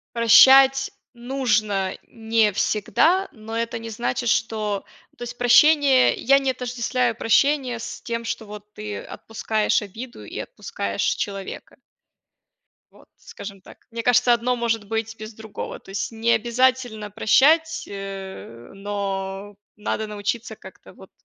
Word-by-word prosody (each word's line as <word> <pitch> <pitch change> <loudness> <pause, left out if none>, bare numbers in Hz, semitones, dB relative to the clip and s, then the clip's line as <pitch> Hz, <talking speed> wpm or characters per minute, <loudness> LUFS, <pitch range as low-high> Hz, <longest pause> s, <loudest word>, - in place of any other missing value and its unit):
прощать 265 +4 +7 0.2
нужно 215 -6 -1
не 225 -1 +1
всегда, 320 - +2
но 225 +1 -7
это 230 0 -2
не 225 0 -7
значит, 235 +2 -2
что 215 -3 -1 0.3
ну, - - -35
то - - -7
есть, 240 0 -7
прощение 270 +2 +5
я 275 +3 +3
не 270 -1 0
отождествляю 250 -1 -1
прощение 255 +2 +2
с - - -7
тем, 230 -1 -4
что 225 -1 -4
вот 210 0 -11
ты 210 0 -6
отпускаешь 220 -1 -1
обиду 220 - -9
и 105 - -7
отпускаешь 100 0 -5
человека. 195 -1 -4 1.1
Вот, - - -21
скажем 200 -1 -10
так. - - -17
Мне 230 0 -4
кажется, 245 0 +4
одно 245 +1 0
может 230 -3 -1
быть 225 +1 -3
без 215 +1 -9
другого. 220 -1 -8
То - - -19
есть, 205 +4 -3
не 225 +1 0
обязательно 240 -2 +1
прощать, 300 - +3
э, 195 -11 -8
но 195 0 -4 0.2
надо 215 +1 -3
научиться 210 +3 -4
как-то - - -15
вот - - -16
225 Hz, 135 wpm, -23 LUFS, 205-245 Hz, 1.1 s, прощать